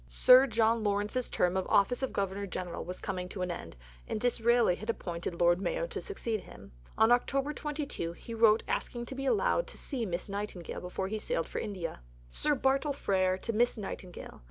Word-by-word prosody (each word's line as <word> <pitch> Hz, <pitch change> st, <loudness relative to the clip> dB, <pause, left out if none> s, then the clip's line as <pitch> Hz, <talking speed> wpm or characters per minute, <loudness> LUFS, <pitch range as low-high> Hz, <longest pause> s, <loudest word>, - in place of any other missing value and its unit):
Sir 250 Hz, -, +7 dB
John 225 Hz, -1 st, +2 dB
Lawrence's 205 Hz, +4 st, 0 dB
term 180 Hz, +1 st, +1 dB
of 190 Hz, -, -1 dB
office 205 Hz, +6 st, +3 dB
of 265 Hz, -, -1 dB
Governor 200 Hz, 0 st, -2 dB
General 180 Hz, -2 st, -4 dB
was 180 Hz, +1 st, -6 dB
coming 180 Hz, -2 st, -4 dB
to 185 Hz, -1 st, -4 dB
an 180 Hz, -, -2 dB
end, 85 Hz, -, -7 dB, 0.3 s
and -, -, -2 dB
Disraeli 235 Hz, -3 st, +3 dB
had 215 Hz, +5 st, -7 dB
appointed 175 Hz, -5 st, -3 dB
Lord 175 Hz, +1 st, +4 dB
Mayo -, -, -1 dB
to -, -, -5 dB
succeed 230 Hz, -, -3 dB
him. -, -, -13 dB, 0.3 s
On 220 Hz, +1 st, +5 dB
October 275 Hz, +4 st, +2 dB
22 290 Hz, -, -4 dB
he 230 Hz, -, -9 dB
wrote 225 Hz, -1 st, +5 dB
asking 240 Hz, -1 st, -2 dB
to 250 Hz, -, -7 dB
be 270 Hz, +1 st, -3 dB
allowed 445 Hz, -, +2 dB
to -, -, -9 dB
see 245 Hz, -6 st, -3 dB
Miss 175 Hz, 0 st, -3 dB
Nightingale 200 Hz, -4 st, -5 dB
before 180 Hz, +1 st, -3 dB
he 215 Hz, +2 st, -3 dB
sailed -, -, -2 dB
for -, -, -4 dB
India: 185 Hz, -, -5 dB, 0.3 s
(_Sir 295 Hz, -, +1 dB
Bartle 270 Hz, +3 st, +2 dB
Frere 185 Hz, -7 st, +1 dB
to 230 Hz, +4 st, -4 dB
Miss 240 Hz, +2 st, +2 dB
Nightingale. 190 Hz, -3 st, -7 dB
215 Hz, 195 wpm, -31 LUFS, 185-245 Hz, 0.3 s, Sir